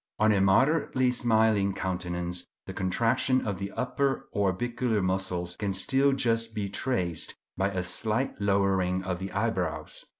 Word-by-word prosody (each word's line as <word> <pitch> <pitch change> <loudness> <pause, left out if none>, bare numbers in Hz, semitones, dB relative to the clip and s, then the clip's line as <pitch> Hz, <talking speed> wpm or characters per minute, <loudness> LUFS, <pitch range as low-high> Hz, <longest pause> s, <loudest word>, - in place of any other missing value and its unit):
On 110 0 +4
a 100 -2 +2
moderately 130 +5 +3
smiling 110 -5 +2
countenance 90 -1 -3 0.2
the - - -7
contraction 115 +7 +1
of 100 -3 -3
the 100 0 -4
upper 135 +2 -1
orbicular 110 +4 0
muscles 95 -2 -1
can 100 -2 -2
still 135 +9 +4
just 115 -4 0
be 100 -2 -2
traced 95 - -2 0.2
by 95 +2 0
a 95 -2 -3
slight 110 +8 0
lowering 95 -2 +1
of 90 -1 -3
the 95 +1 -5
eyebrows. 95 -8 -2
100 Hz, 140 wpm, -28 LUFS, 95-115 Hz, 0.2 s, On